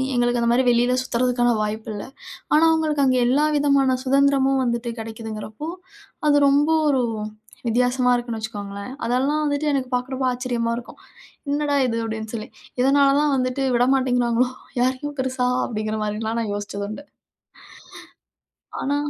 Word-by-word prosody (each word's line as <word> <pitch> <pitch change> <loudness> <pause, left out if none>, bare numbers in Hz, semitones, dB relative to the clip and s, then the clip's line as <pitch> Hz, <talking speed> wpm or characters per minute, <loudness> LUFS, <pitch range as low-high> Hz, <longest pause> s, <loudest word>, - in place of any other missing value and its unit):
எங்களுக்கு 240 0 +1
அந்த 235 - +2
மாரி 250 +2 +3
வெளியில 245 +1 +2
சுத்துறதுக்கான 245 -1 +1
வாய்ப்பு 215 +2 -3
இல்ல. 205 - -5 0.5
ஆனா 305 +2 +5
அவங்களுக்கு 310 -3 +1
அங்கே 255 -1 +3
எல்லா 280 +5 +3
விதமான 280 -2 +3
சுதந்திரமும் 270 0 +3
வந்துட்டு 235 -1 -1
கிடைக்குதுங்கிறப்போ, 220 +4 -6 0.6
அது 290 -1 +5
ரொம்ப 285 +2 +3 0.2
ஒரு 265 -3 +2 0.7
வித்தியாசமா 250 +2 +2
இருக்குன்னு 240 -2 -3
வச்சுக்கோங்களேன். 205 +1 -6
அதெல்லாம் 265 +6 +1
வந்துட்டு, 290 +1 -1
எனக்கு 260 -2 -1
பார்க்குறப்போ 260 +1 -2
ஆச்சரியமா 245 -2 -2
இருக்கும். 240 - -9 0.5
"என்னடா 290 0 0
இது?" 230 -1 -1
அப்படின்னு 220 -1 -5
சொல்லி! 215 -1 -5 0.3
இதனால 275 +1 +4
தான் 295 -1 +2
வந்துட்டு 255 +1 -1
விட 245 - +3
மாட்டேங்கிறாங்களோ 245 -2 +1 0.3
யாரையும் 260 +3 -1
பெருசா, 260 -1 0 0.2
அப்படிங்கிற 215 -1 -3
மாதிரிலாம் 220 +2 -2
நான் 210 -3 -3
யோசிச்சது 205 0 -5
உண்டு. 215 +7 -7 1.8
ஆனா 285 +1 0
250 Hz, 140 wpm, -22 LUFS, 230-275 Hz, 1.8 s, ஆனா